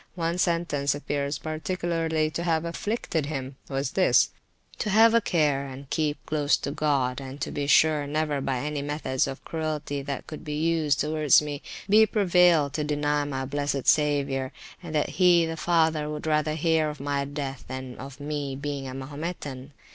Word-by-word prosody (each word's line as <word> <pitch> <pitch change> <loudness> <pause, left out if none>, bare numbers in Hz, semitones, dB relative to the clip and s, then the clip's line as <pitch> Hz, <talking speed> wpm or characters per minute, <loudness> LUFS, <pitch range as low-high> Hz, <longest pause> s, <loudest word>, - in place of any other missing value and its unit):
One 170 0 -1
sentence 170 -5 +1
appears 145 0 -2
particularly 160 -1 -1
to 170 - -3
have 165 -1 0
afflicted 170 -3 -2
him: 135 -3 -5
it - - -12
was 135 0 -1
this, 190 - +4 0.5
to 210 - -1
have 225 +3 +6
a 230 - +5
care 145 -7 +1
and 135 +1 -9
keep 150 -2 -1
close 150 -2 +2
to 140 - -4
God, 140 -4 0
and 135 +1 -8
to - - -2
be 145 -1 -2
sure 150 0 +4
never, 150 -1 -1
by 135 -1 -1
any 150 -1 -3
methods 140 -3 -1
of 135 -1 -7
cruelty 155 -3 -3
that 140 0 -5
could 155 - -8
be 150 -2 -4
used 160 -2 +1
towards 150 -2 +4
me, 145 -1 -5 0.3
be 215 +2 +6
prevailed 180 - +4
to 150 - -1
deny 145 0 0
my 135 -2 -3
blessed 140 0 -2
Saviour, 140 -3 +2 0.3
and 165 -3 -6
that 150 - +1
he 175 -2 +6
(the 165 0 -3
father) 160 -2 +1
would 150 0 -5
rather 155 0 +1
hear 160 -1 +2
of 150 - -7
my 140 0 -1
death 140 -1 -5
than 130 -1 -6
of 135 +1 -9
my 145 -2 -3
being 140 -2 -4
a 130 - -6
Mahometan. 145 -1 -6
150 Hz, 180 wpm, -26 LUFS, 140-160 Hz, 0.5 s, have